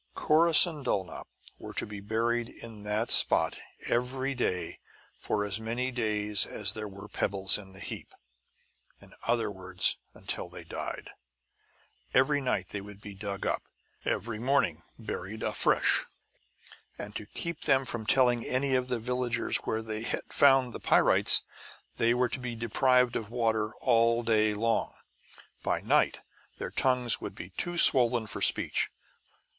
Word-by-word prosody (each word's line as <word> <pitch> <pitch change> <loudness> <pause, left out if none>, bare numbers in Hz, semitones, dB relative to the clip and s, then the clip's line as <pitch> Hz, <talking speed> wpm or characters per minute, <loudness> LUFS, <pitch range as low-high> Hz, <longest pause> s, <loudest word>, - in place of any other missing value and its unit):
Corrus 165 +2 +6
and 155 -5 -7
Dulnop 95 -8 -3 0.3
were - - -9
to - - +1
be 105 -1 -8
buried 115 +3 -1
in 115 -3 -10
that 105 +3 0
spot - - +5 0.3
every 130 +3 -1
day 95 -8 -2 0.4
for 105 -1 -1
as 105 +1 -2
many 120 +3 -3
days 105 -4 0
as 105 0 -2
there 110 -1 -5
were 100 0 -11
pebbles 95 0 0
in 95 -2 -13
the 95 - -12
heap; - - -7 0.8
in - - -17
other 115 -2 +1
words, 95 -1 -1 0.2
until - - -5
they - - -8
died. - - -6 1.0
Every 145 +2 +3
night 110 -8 -2
they 100 - -5
would 100 0 -12
be 105 -1 -10
dug 100 0 -6
up, - - -1 0.4
and - - -1
every 115 -1 -6
morning 125 - +1 0.2
buried 110 -1 -6
afresh. - - +2 0.9
And 105 0 -8
to 105 - -6
keep 170 +6 -3
them 135 -2 +3
from 115 -3 -5
telling 125 -3 +3
any 130 +1 0
of 125 -1 +1
the 125 -1 -1
villagers 120 0 -1
where 110 0 -2
they 110 -1 -5
had 115 - -3
found 135 -3 +4
the - - -7
pyrites, - - +4 0.5
they 115 +1 +2
were 125 0 +1
to - - -4
be 125 -2 -5
deprived 125 +2 +2
of 105 - -4
water 110 -2 -1
all 115 +1 +3
day 110 -2 +2
long. 115 +2 -1 0.7
By - - -1
night - - +1 0.4
their - - -6
tongues 125 -3 +2
would - - -6
be 90 - -9
too 175 - -4
swollen 120 -7 +6
for 105 - -6
speech. - - +3
115 Hz, 155 wpm, -29 LUFS, 105-125 Hz, 1.0 s, Corrus